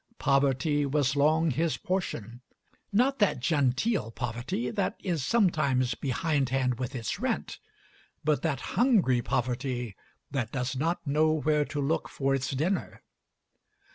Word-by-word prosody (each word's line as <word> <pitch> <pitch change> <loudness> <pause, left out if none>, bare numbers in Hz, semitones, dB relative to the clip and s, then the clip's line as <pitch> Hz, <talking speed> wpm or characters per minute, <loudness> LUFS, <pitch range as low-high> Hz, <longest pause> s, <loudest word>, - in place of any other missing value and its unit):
Poverty 140 +2 +2
was 145 0 +1
long 155 +3 +3
his 160 +5 0
portion; 120 - -3 0.5
not 255 +6 +2
that 205 - +2
genteel 140 - +1
poverty 120 +1 -3
that - - -1
is 170 -7 -1
sometimes 140 - +2
behindhand 135 -2 0
with 130 +1 -4
its 115 -4 -3
rent, - - -2 0.6
but 150 -1 +1
that 155 -5 -1
hungry 205 - +3
poverty 125 -3 -2 0.4
that 130 -5 -2
does 125 0 -2
not 165 +6 -1
know 155 +2 +3
where 150 -1 +1
to 145 - -5
look 145 +3 0
for 135 0 0
its 135 0 -1
dinner. 160 +8 -2
140 Hz, 130 wpm, -28 LUFS, 125-160 Hz, 0.6 s, long